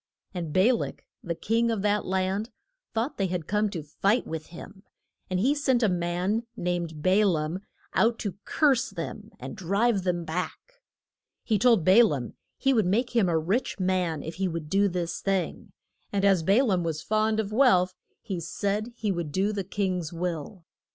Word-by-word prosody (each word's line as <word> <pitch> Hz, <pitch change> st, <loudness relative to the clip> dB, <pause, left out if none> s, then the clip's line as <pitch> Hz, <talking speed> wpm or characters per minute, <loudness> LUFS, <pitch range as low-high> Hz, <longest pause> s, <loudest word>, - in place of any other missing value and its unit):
And 170 Hz, -4 st, -4 dB
Ba 190 Hz, +10 st, +4 dB
lak, 235 Hz, -, -4 dB, 0.2 s
the 170 Hz, -1 st, -3 dB
king 230 Hz, +6 st, +1 dB
of 220 Hz, -4 st, -1 dB
that 210 Hz, 0 st, +1 dB
land, 190 Hz, +4 st, -1 dB, 0.4 s
thought 230 Hz, +4 st, -2 dB
they 195 Hz, -, +2 dB
had 175 Hz, -3 st, -3 dB
come 210 Hz, +3 st, +1 dB
to 170 Hz, -6 st, -5 dB
fight 195 Hz, -, +1 dB
with 160 Hz, -1 st, -5 dB
him, 190 Hz, +3 st, -11 dB, 0.5 s
and 185 Hz, -1 st, 0 dB
he 260 Hz, +9 st, +3 dB
sent 265 Hz, -5 st, +1 dB
a -, -, +5 dB
man 180 Hz, +4 st, 0 dB, 0.2 s
named 170 Hz, -3 st, -2 dB
Ba 190 Hz, +3 st, +4 dB
laam 165 Hz, -2 st, 0 dB, 0.3 s
out 230 Hz, +1 st, +3 dB
to 200 Hz, -2 st, -5 dB
curse 275 Hz, -6 st, +2 dB
them 205 Hz, +4 st, -6 dB
and 130 Hz, +1 st, -7 dB
drive 200 Hz, +4 st, +1 dB
them 175 Hz, -2 st, -1 dB
back. 180 Hz, -, -5 dB, 0.6 s
He 215 Hz, -3 st, +1 dB
told 225 Hz, -6 st, +4 dB
Ba 195 Hz, +6 st, +8 dB
laam 140 Hz, -, -1 dB, 0.2 s
he 270 Hz, 0 st, +2 dB
would 220 Hz, -7 st, +2 dB
make 235 Hz, +7 st, +1 dB
him 205 Hz, -6 st, +4 dB
a 165 Hz, -, +2 dB
rich 195 Hz, +9 st, -1 dB
man 180 Hz, -4 st, 0 dB
if 160 Hz, -, -5 dB
he 190 Hz, -, +2 dB
would 165 Hz, -3 st, -5 dB
do 200 Hz, +1 st, +4 dB
this 175 Hz, -2 st, -3 dB
thing, 195 Hz, -2 st, -2 dB, 0.4 s
and 200 Hz, -1 st, +1 dB
as 195 Hz, -3 st, +4 dB
Ba 200 Hz, +10 st, +4 dB
laam 185 Hz, -6 st, +1 dB
was 160 Hz, -2 st, -3 dB
fond 215 Hz, 0 st, +1 dB
of 210 Hz, -2 st, -2 dB
wealth 210 Hz, -7 st, +4 dB, 0.3 s
he 195 Hz, -6 st, -3 dB
said 205 Hz, +7 st, -2 dB
he 215 Hz, -4 st, -1 dB
would 170 Hz, -5 st, -3 dB
do 195 Hz, +6 st, +1 dB
the 200 Hz, -2 st, -2 dB
king's 185 Hz, -4 st, -2 dB
will. 170 Hz, +1 st, -4 dB
190 Hz, 185 wpm, -27 LUFS, 175-215 Hz, 0.6 s, Ba